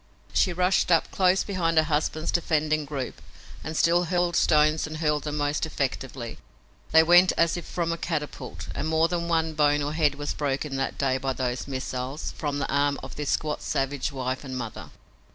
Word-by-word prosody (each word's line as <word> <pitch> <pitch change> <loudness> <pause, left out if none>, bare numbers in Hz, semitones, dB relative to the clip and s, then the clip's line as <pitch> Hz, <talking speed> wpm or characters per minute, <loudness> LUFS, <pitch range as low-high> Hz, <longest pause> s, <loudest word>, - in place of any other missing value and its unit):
She 185 - +3
rushed 180 +1 +2
up 165 - +3
close 185 0 +3
beside 170 -5 -1
her 160 - +7
husband's 155 0 -1
defending 155 -2 +1
group 140 -3 -5 0.4
and 155 0 -4
still 175 +1 +3
hurled 175 0 0
stones 155 0 +3
and 155 +1 -6
hurled 150 -1 0
them 150 0 -3
most 145 +1 0
effectively. 130 -5 -3 0.5
They 160 0 +7
went 175 +2 +6
as 165 -1 +3
if 175 - -5
from 170 -1 -2
a 165 - -3
catapult, 150 -4 -4
and - - -3
more 160 +1 +3
than 170 -1 -2
one 160 -1 +1
bone 145 -1 +2
or 145 +1 -2
head 150 -3 +2
was 145 0 -3
broken 140 0 -2
that 135 - -2
day 130 -1 +1
by 135 0 -1
those 125 -1 -3
missiles 130 +1 -4
from 145 -2 -3
the 140 - -1
arm 140 0 +1
of - - -8
this 150 -1 -3
squat 150 -1 -1
savage 135 0 -1
wife 130 0 -3
and 130 -2 -5
mother. 120 -4 -6
150 Hz, 190 wpm, -26 LUFS, 140-165 Hz, 0.5 s, her